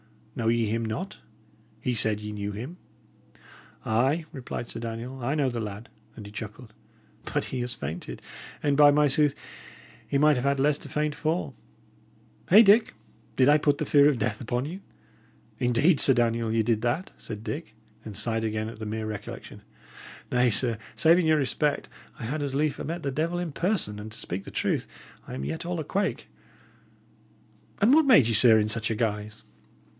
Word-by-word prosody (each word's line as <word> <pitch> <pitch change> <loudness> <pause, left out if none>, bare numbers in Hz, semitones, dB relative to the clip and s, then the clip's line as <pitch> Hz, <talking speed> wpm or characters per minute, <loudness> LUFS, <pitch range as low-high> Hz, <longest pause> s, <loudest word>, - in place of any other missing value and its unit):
Know 115 - -2
ye 115 0 +2
him 115 +2 -1
not? 140 - -4 0.6
He 125 - -1
said 110 -2 +1
ye 105 0 -6
knew 105 -1 -4
him!" 125 - -7 1.1
"Ay," 135 +9 +1
replied 130 -5 -6
Sir - - -6
Daniel, 120 +3 -6
"I 135 +5 0
know 140 -4 +1
the 120 -1 -4
lad;" 105 +1 -6 0.3
and 105 - -10
he 100 - -10
chuckled. 110 +1 -9 0.6
"But - - -1
he 130 - -4
has 125 0 -3
fainted; 80 - -6 0.4
and, 145 -1 +2
by 145 0 +7
my 150 +1 +4
sooth, 145 +1 +3 0.7
he 140 - 0
might 150 0 +4
have 125 - -2
had 140 0 +1
less 145 +1 +2
to - - -8
faint 150 0 -1
for! 155 -2 -2 1.0
Hey, 210 +6 +9
Dick? 215 - +4 0.4
Did 130 +1 +4
I 150 +1 +5
put 145 -1 +2
the - - -2
fear 145 0 +5
of 140 - 0
death 110 -1 -2
upon 120 +2 -2
you?" 175 +6 -6 0.8
"Indeed, 125 +7 +3
Sir 135 - +7
Daniel, 115 -1 +1
ye 115 0 +2
did 110 -1 0
that," 120 +10 -1
said 105 0 -8
Dick, 145 -3 -6 0.3
and 105 -2 -8
sighed 115 +2 0
again 110 0 -2
at 115 - -11
the 110 - -5
mere 110 +1 -3
recollection. 105 -2 -7 0.7
"Nay, 125 0 +3
sir, 115 0 +2 0.2
saving 165 +1 +4
your 155 -1 +4
respect, 145 +1 -1 0.3
I 115 - -7
had 145 +6 -3
as 140 -2 -3
lief 150 +1 0
'a' - - -4
met 165 +2 -5
the 140 - -1
devil 165 +6 -1
in 175 -2 -3
person; 170 - -1
and 110 +1 -8
to 110 - -7
speak 95 +3 -5
truth, - - -1 0.4
I - - -6
am 65 +1 -5
yet 75 +3 -4
all 175 0 -3
a - - -2
quake. 195 +6 -2 1.5
But 210 - +3
what 310 +3 +6
made 240 - +6
ye, 115 - +1
sir, 110 +1 +6
in 105 0 +1
such 110 0 +2
a 115 - -1
guise?" 105 -1 -3
125 Hz, 190 wpm, -26 LUFS, 110-150 Hz, 1.5 s, Hey